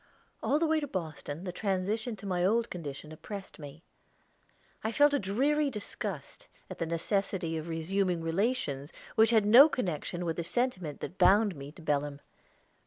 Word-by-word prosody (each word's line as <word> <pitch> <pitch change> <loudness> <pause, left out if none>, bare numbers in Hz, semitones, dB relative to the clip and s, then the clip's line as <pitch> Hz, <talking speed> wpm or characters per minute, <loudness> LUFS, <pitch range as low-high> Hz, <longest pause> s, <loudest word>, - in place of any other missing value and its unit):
All 290 - +2
the 330 - +2
way 315 0 +2
to 290 - -4
Boston 160 - -5
the 185 - -4
transition 205 +4 -1
to 205 - -12
my 180 -2 0
old 230 +5 +2
condition 150 -3 -7
oppressed 195 +5 -8
me. 150 +2 -10 1.0
I 220 - 0
felt 290 +5 +4
a 285 - +3
dreary 275 +10 +1
disgust 210 -5 -5 0.2
at - - -7
the 165 - -1
necessity 170 0 -1
of 160 0 -4
resuming 175 +1 -1
relations 165 - -1 0.2
which 220 0 +5
had 220 -3 +4
no 250 +9 +9
connection 175 - -3
with 165 -1 -2
the 170 - -1
sentiment 185 - -2
that 185 - -7
bound 205 -1 +5
me 140 0 -8
to 165 - -14
Belem. 145 -1 -1
190 Hz, 170 wpm, -30 LUFS, 165-225 Hz, 1.0 s, no